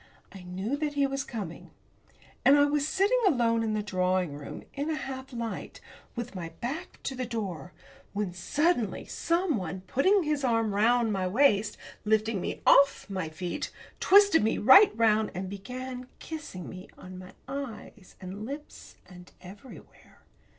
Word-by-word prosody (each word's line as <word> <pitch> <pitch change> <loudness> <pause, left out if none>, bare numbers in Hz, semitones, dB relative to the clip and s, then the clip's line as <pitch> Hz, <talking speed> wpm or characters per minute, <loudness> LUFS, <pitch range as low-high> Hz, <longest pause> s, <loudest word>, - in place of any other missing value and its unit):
I 195 - -11
knew 190 +9 -3
that 295 -1 -2
he 285 -1 +3
was 275 0 -2
coming. 205 -11 -7 0.7
And 280 +2 +7
I 285 - +6
was 290 0 +1
sitting 400 +9 +2
alone 235 -8 +2
in 220 -1 -1
the 210 - -1
drawing 185 -5 0
room, 145 0 -8
in 285 +2 -3
a 315 - 0
half 265 -2 -6
light, 235 -2 -5 0.4
with 240 -2 -5
my 175 -4 -5
back 310 +10 -5
to 270 - -3
the 255 -1 -4
door, 190 - -5 0.4
when 200 -3 -3
suddenly 245 - 0
someone, 270 - -1
putting 360 - +2
his 300 -2 -1
arm 225 -4 +1
round 225 +2 +3
my 190 -2 -1
waist, 215 -1 +3 0.3
lifting 215 -1 +1
me - - -5
off 280 0 +5
my 185 -4 -3
feet, 175 +2 -4 0.3
twisted 400 - +6
me 220 - +1
right 320 - +8
round, 220 -1 +3
and 185 +1 -4
began 250 +5 -7
kissing 300 - -7
me 185 +1 -9
on 185 0 -10
my 185 0 -11
eyes 235 -7 -7
and 190 +3 -7
lips 285 +6 -9
and 180 -1 -14
everywhere. 195 - -14
225 Hz, 155 wpm, -28 LUFS, 190-280 Hz, 0.7 s, right